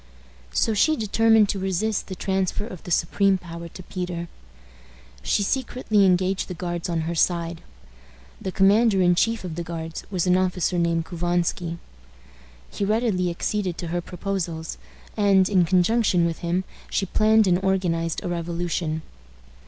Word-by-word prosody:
So 220 Hz, -, +1 dB
she 310 Hz, +10 st, +3 dB
determined 220 Hz, 0 st, +4 dB
to 200 Hz, -, -1 dB
resist 195 Hz, +3 st, -1 dB
the 185 Hz, -, -6 dB
transfer 190 Hz, +1 st, -1 dB
of 185 Hz, -7 st, -9 dB
the -, -, -7 dB
supreme 190 Hz, +3 st, +2 dB
power 170 Hz, -1 st, -8 dB
to 185 Hz, +2 st, -11 dB
Peter. 175 Hz, -2 st, -5 dB, 0.9 s
She 70 Hz, -, +1 dB
secretly 220 Hz, -3 st, +1 dB
engaged 185 Hz, +1 st, +1 dB
the 180 Hz, -, -6 dB
Guards 175 Hz, 0 st, -4 dB
on 165 Hz, -1 st, 0 dB
her 165 Hz, +2 st, -2 dB
side. 170 Hz, 0 st, 0 dB, 0.8 s
The 190 Hz, -, -3 dB
commander 200 Hz, +2 st, +4 dB
in 175 Hz, 0 st, +5 dB
chief 225 Hz, +5 st, +1 dB
of 180 Hz, -3 st, -5 dB
the 170 Hz, -, -4 dB
Guards 165 Hz, -1 st, -6 dB
was 185 Hz, -4 st, -1 dB
an 180 Hz, 0 st, +4 dB
officer 180 Hz, -1 st, 0 dB
named 165 Hz, -1 st, +1 dB
Couvansky. 175 Hz, 0 st, -1 dB, 0.9 s
He -, -, -3 dB
readily 210 Hz, -4 st, +1 dB
acceded 180 Hz, +1 st, -2 dB
to 175 Hz, -, -5 dB
her 175 Hz, +1 st, -1 dB
proposals, 175 Hz, -3 st, -4 dB, 0.4 s
and, 195 Hz, -3 st, +4 dB
in 185 Hz, -3 st, +3 dB
conjunction 185 Hz, 0 st, +3 dB
with 165 Hz, -1 st, -2 dB
him, 175 Hz, +2 st, -1 dB, 0.3 s
she 195 Hz, -, 0 dB
planned 215 Hz, +3 st, +4 dB
and 185 Hz, 0 st, +2 dB
organized 170 Hz, -4 st, 0 dB
a -, -, -3 dB
revolution. 170 Hz, -2 st, -2 dB
180 Hz, 150 wpm, -24 LUFS, 170-195 Hz, 0.9 s, in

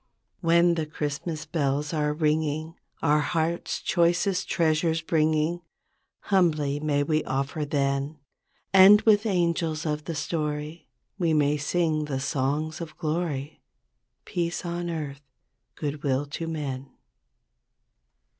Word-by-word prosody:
13 170 Hz, -, -5 dB
"When 170 Hz, +1 st, +5 dB
the 160 Hz, -2 st, -2 dB
Christmas 155 Hz, +1 st, -4 dB
bells 145 Hz, -1 st, -1 dB
are 150 Hz, -1 st, +1 dB
ringing 155 Hz, +1 st, 0 dB, 0.3 s
Our 150 Hz, -1 st, +4 dB
hearts' 160 Hz, +4 st, -1 dB
choicest 180 Hz, +2 st, +1 dB
treasures 160 Hz, 0 st, +2 dB
bringing, 160 Hz, +1 st, +1 dB, 0.6 s
Humbly 155 Hz, -7 st, +1 dB
may 145 Hz, -1 st, +1 dB
we 155 Hz, +1 st, +1 dB
offer 140 Hz, +3 st, -2 dB
then, 140 Hz, +1 st, -1 dB, 0.6 s
And 195 Hz, +2 st, +9 dB
with 215 Hz, 0 st, +4 dB
angels 170 Hz, -4 st, 0 dB
of 150 Hz, -1 st, -2 dB
the 165 Hz, -, -4 dB
story 150 Hz, +1 st, -3 dB, 0.3 s
We 165 Hz, -3 st, +2 dB
may 145 Hz, -1 st, +3 dB
sing 155 Hz, +1 st, 0 dB
the 135 Hz, -3 st, -3 dB
songs 145 Hz, +4 st, -1 dB
of 155 Hz, -2 st, -8 dB
glory, 155 Hz, -3 st, -3 dB, 0.6 s
Teace 175 Hz, -1 st, -2 dB
on 175 Hz, 0 st, -3 dB
earth, 150 Hz, -4 st, -5 dB, 0.5 s
good 145 Hz, -1 st, -4 dB
will 140 Hz, -1 st, 0 dB
to 165 Hz, -, -3 dB
men.' 140 Hz, -4 st, -4 dB
155 Hz, 120 wpm, -26 LUFS, 145-170 Hz, 0.6 s, And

